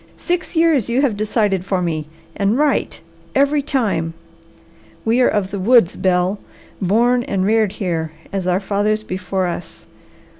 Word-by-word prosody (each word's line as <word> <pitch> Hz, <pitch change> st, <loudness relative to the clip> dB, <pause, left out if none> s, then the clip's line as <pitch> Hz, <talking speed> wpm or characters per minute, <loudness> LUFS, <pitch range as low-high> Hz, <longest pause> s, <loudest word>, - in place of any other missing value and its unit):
"Six 355 Hz, 0 st, -3 dB
years 320 Hz, -8 st, +3 dB
you 250 Hz, +4 st, +2 dB
have 250 Hz, -7 st, +1 dB
decided 205 Hz, -3 st, 0 dB
for 190 Hz, -1 st, -1 dB
me, 160 Hz, -4 st, -2 dB, 0.3 s
and 200 Hz, +4 st, +1 dB
right 295 Hz, -1 st, +1 dB, 0.4 s
every 285 Hz, +1 st, +3 dB
time! 205 Hz, -, -1 dB, 0.9 s
We 230 Hz, +3 st, +3 dB
are 245 Hz, -, +5 dB
of 200 Hz, -2 st, 0 dB
the 200 Hz, -, -3 dB
woods, 225 Hz, -2 st, +4 dB
Bel, 185 Hz, +2 st, +1 dB, 0.4 s
born 235 Hz, +6 st, +3 dB
and 190 Hz, -1 st, -1 dB
reared 215 Hz, -1 st, +2 dB
here 165 Hz, -5 st, -2 dB, 0.2 s
as 190 Hz, -2 st, -2 dB
our 180 Hz, +1 st, +2 dB
fathers 205 Hz, +2 st, 0 dB
before 185 Hz, -1 st, -2 dB
us. 175 Hz, -1 st, -6 dB
205 Hz, 150 wpm, -19 LUFS, 185-245 Hz, 0.9 s, are